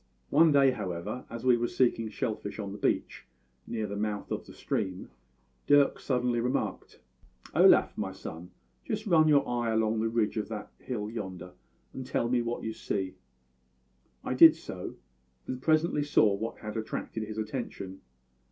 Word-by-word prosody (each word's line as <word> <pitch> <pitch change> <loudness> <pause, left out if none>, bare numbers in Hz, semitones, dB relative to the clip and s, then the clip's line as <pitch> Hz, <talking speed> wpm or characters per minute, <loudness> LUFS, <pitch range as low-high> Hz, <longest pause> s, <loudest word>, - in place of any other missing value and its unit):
"One 160 +2 +6
day, 140 -2 +5
however, 105 +1 -4
as 115 +1 -7
we 125 -2 +5
were 120 0 0
seeking 115 -3 +1
shell 110 - -2
fish 100 -1 -7
on 100 -2 -5
the 105 - -8
beach - - -1 0.4
near 110 -2 -2
the 100 0 -5
mouth 105 0 -3
of - - -3
the - - -11
stream, 95 -7 -3 0.6
Dirk 145 -1 +5
suddenly 125 -2 0
remarked: 125 +2 -2 0.5
"`Olaf, - - +5
my - - -3
son, 85 +2 -8 0.3
just 215 -1 -3
run 165 -6 +5
your 145 -2 +4
eye 120 -1 -1
along 110 0 +1
the 115 +1 +1
ridge 110 -1 0
of 105 - -1
that 105 -2 -6
hill 110 -5 -4
yonder, 95 -5 -6 0.4
and 130 - -5
tell 120 -2 -1
me 125 -1 +2
what 120 0 -3
you 110 - -3
see.' 95 -3 -3 1.1
"I - - -2
did 160 +5 +9
so; 95 - -7 0.5
and 130 0 -5
presently 155 0 +2
saw 115 -8 +4
what 110 +3 -4
had 105 -1 -7
attracted 110 0 -4
his 110 0 -7
attention. 105 -4 -5
115 Hz, 170 wpm, -29 LUFS, 105-130 Hz, 1.1 s, did